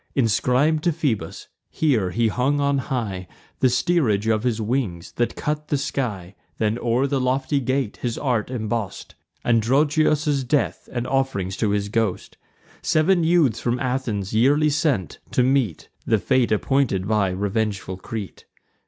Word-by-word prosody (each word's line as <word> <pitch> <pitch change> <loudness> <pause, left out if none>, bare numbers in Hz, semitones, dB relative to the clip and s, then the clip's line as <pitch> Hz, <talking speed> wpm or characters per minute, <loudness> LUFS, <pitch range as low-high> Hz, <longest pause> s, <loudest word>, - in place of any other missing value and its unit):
Inscrib'd 130 +6 +2
to 175 - +4
Phoebus, 135 - -3 0.2
here 125 -12 +1
he 115 +4 +1
hung 135 +6 +1
on 140 -1 +1
high 105 -9 -3 0.3
The 130 - +4
steerage 120 - +1
of 110 -1 +2
his 120 -2 -1
wings, 110 -7 -2
that 120 - 0
cut 150 0 -3
the 145 - +1
sky: 105 -10 -3 0.2
Then 110 +1 0
o'er 120 +3 +1
the 140 -1 0
lofty 130 +3 +1
gate 130 -3 -1
his 120 -2 -3
art 125 -6 -1
emboss'd 115 -4 -4 0.3
Androgeos' 145 +5 +2
death, 145 +3 0
and 120 -1 -3
off'rings 130 -9 -1
to 110 - +1
his 100 0 -1
ghost; 110 -3 -2 0.4
Sev'n 170 +3 +3
youths 160 -9 +3
from 120 +1 0
Athens 125 -7 -2
yearly 145 +7 +3
sent, 140 - 0
to 125 - +2
meet 130 - 0 0.2
The 110 - +4
fate 120 +3 +1
appointed 110 -4 +1
by 105 -3 +2
revengeful 100 0 -2
Crete. 105 +1 -7
125 Hz, 145 wpm, -23 LUFS, 105-140 Hz, 0.4 s, to